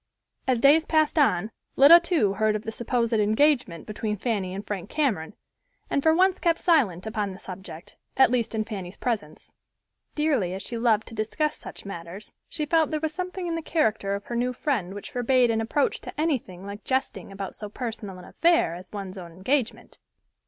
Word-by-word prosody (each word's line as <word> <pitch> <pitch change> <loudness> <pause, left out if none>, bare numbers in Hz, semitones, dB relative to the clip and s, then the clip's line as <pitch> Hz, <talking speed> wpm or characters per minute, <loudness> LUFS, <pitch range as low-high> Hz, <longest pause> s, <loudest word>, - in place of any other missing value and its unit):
As 255 -2 +2
days 300 +3 +6
passed 310 0 +2
on 215 -7 +2 0.2
Lida 305 +5 +9
too 335 - +1
heard 215 +1 +1
of 215 - -3
the 220 - -4
supposed 235 0 -1
engagement 220 - +2
between 210 0 -3
Fanny 200 -4 -2
and 195 +2 -6
Frank 200 -4 -5
Cameron, 215 - -1 0.6
and 280 - +2
for 320 - +4
once 375 +1 +3
kept 335 -2 +2
silent 235 - +2
upon 210 -3 -2
the 190 - -11
subject, 185 -4 -10 0.2
at 265 -2 +6
least 235 -2 0
in 215 - 0
Fanny's 195 -4 -7
presence. 215 -11 -4 0.6
Dearly 270 - +1
as 190 - -6
she 235 - -5
loved 225 -2 +2
to - - -12
discuss 225 +8 -1
such - - -10
matters, 180 +2 -8 0.2
she 305 -2 -3
felt 320 +1 +2
there 310 - -1
was 315 0 -2
something 365 +1 -4
in 340 - -2
the 330 - -2
character 220 -11 0
of 200 - -6
her 240 - -5
new 250 +1 0
friend 235 - -2
which 205 - -8
forbade 245 0 +3
an 225 0 0
approach 270 +6 0
to - - -9
anything 235 - -2
like 200 +1 -8
jesting 260 -8 -2
about 195 -1 -6
so 210 - -6
personal 215 -4 -6
an 180 - -11
affair 335 - +2
as 180 +2 -10
one's 195 -2 -6
own 170 -2 -9
engagement. 225 - -2
225 Hz, 195 wpm, -26 LUFS, 195-290 Hz, 0.6 s, Lida